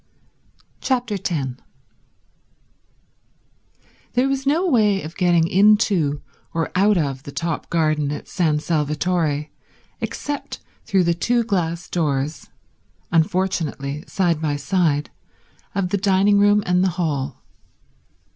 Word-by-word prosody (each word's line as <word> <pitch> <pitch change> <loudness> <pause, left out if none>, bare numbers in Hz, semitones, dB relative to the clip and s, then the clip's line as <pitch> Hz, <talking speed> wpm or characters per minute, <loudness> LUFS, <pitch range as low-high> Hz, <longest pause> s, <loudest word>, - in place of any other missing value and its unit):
Chapter 245 -5 -1
10 140 -9 -3 2.5
There 250 +2 +2
was 275 0 -2
no 330 +6 +2
way 210 - +3
of 155 +2 -8
getting 175 -3 +3
into 190 -7 +3 0.3
or 165 -1 -1
out 200 +2 +3
of 140 -5 -1
the 140 - -9
top 165 +2 -3
garden 155 -3 +1
at 150 - -6
San 160 -5 +1
Salvatore 150 0 -1 0.5
except 290 0 -5 0.3
through 195 -3 +2
the 170 0 +2
two 235 +8 +1
glass 175 -6 -2
doors, 150 -3 -2 0.6
unfortunately 165 -5 0
side 170 -5 0
by 150 -2 0
side, 150 -1 0 0.6
of 190 -2 0
the 200 - +1
dining 200 +1 +3
room 205 0 +4
and 180 +1 +2
the 190 - +3
hall. 145 -6 -2
175 Hz, 115 wpm, -21 LUFS, 150-200 Hz, 2.5 s, room